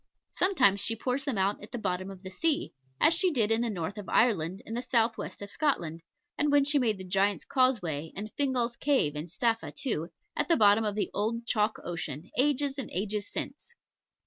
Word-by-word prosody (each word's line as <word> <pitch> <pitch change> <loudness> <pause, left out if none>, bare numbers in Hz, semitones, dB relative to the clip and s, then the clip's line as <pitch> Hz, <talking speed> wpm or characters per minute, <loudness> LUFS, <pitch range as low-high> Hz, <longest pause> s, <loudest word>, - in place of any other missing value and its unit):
Sometimes 260 - +3
she 225 +3 0
pours 255 +4 -2
them 270 -7 -1
out 195 +2 +1
at 210 - -10
the 245 - -4
bottom 185 -3 -2
of 190 -1 -11
the 190 - -7
sea, 305 - 0 0.3
as 325 - +6
she 360 +2 +3
did 230 -9 +1
in 225 +1 +3
the 240 - 0
north 195 +1 -4
of 205 - -8
Ireland 190 -5 +2
and 225 - -5
the 240 - -1
south 230 -2 +2
west - - -6
of 200 - -6
Scotland, 170 - -1 0.4
when 290 -1 +4
she 290 0 +3
made 225 -5 +1
the 190 - -7
Giant's 195 +2 +1
Causeway, 180 - 0
and 215 +2 -6
Fingal's 250 -4 +1
Cave 260 - +1
in 150 +3 -4
Staffa 225 +6 -1
too, 180 - -2 0.3
at - - 0
the 335 - +4
bottom 210 0 +5
of 210 -2 -1
the 210 - -1
old 230 +3 -1
chalk 215 -2 +1
ocean, 170 -1 -5
ages 280 +1 +2
and 265 - -4
ages 205 +2 -2
since. 475 - -5
220 Hz, 205 wpm, -29 LUFS, 195-260 Hz, 0.4 s, as